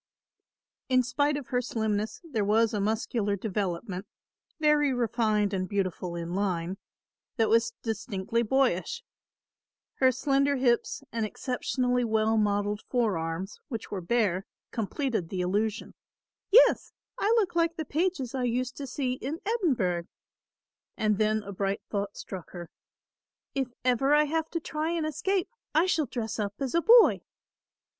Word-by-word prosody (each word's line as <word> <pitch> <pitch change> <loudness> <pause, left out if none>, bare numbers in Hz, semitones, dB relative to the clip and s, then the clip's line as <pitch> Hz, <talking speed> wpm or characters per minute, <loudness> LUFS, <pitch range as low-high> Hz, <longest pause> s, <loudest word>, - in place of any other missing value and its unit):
In 255 -1 +4
spite 285 +4 +1
of 285 - -7
her 245 -1 +1
slimness 220 -3 -2
there 255 -11 -2
was 220 +3 +3
a 210 - 0
muscular 215 0 0
development, 195 -1 -3 0.5
very 300 -2 +4
refined 220 -4 +1
and 185 -1 -1
beautiful 185 -3 -2
in 170 0 -4
line, 185 -1 -1 0.6
that 225 -2 +3
was 230 +1 +3
distinctly 220 0 -1
boyish. 240 -5 +1 1.0
Her 260 -1 +6
slender 275 +2 +2
hips 250 +1 +1
and 230 -1 -1
exceptionally 250 +2 -1
well 220 -1 +2
modelled 205 -1 +1
forearms, 190 -6 -1
which 230 -6 -6
were 195 -3 -3
bare, 195 -1 +1 0.2
completed 225 - -2
the 185 -2 -2
illusion. 205 +4 -1 0.6
"Yes, 465 +5 +5 0.3
I 415 - +2
look 400 -6 +1
like 335 0 +2
the 315 -2 -4
pages 310 -6 -1
I 255 -2 -1
used 250 +1 -1
to 280 - -5
see 255 -1 -1
in 275 +5 -4
Edinburgh"; 255 - +1 0.9
and 210 -1 +1
then 215 0 +2
a 200 - -7
bright 200 +1 -2
thought 200 -1 -2
struck 185 -3 -7
her; 175 -2 -8 0.8
"If 270 -2 0 0.2
ever 270 +3 +4
I 300 - +5
have 320 +2 -1
to 335 - -2
try 310 0 -3
and 335 -2 -1
escape 355 +5 0 0.3
I 320 +3 +5
shall 320 -6 +1
dress 220 -3 -4
up 205 -1 -2
as 270 -2 -2
a 335 - +3
boy." 465 +4 +7
230 Hz, 145 wpm, -28 LUFS, 200-275 Hz, 1.0 s, boy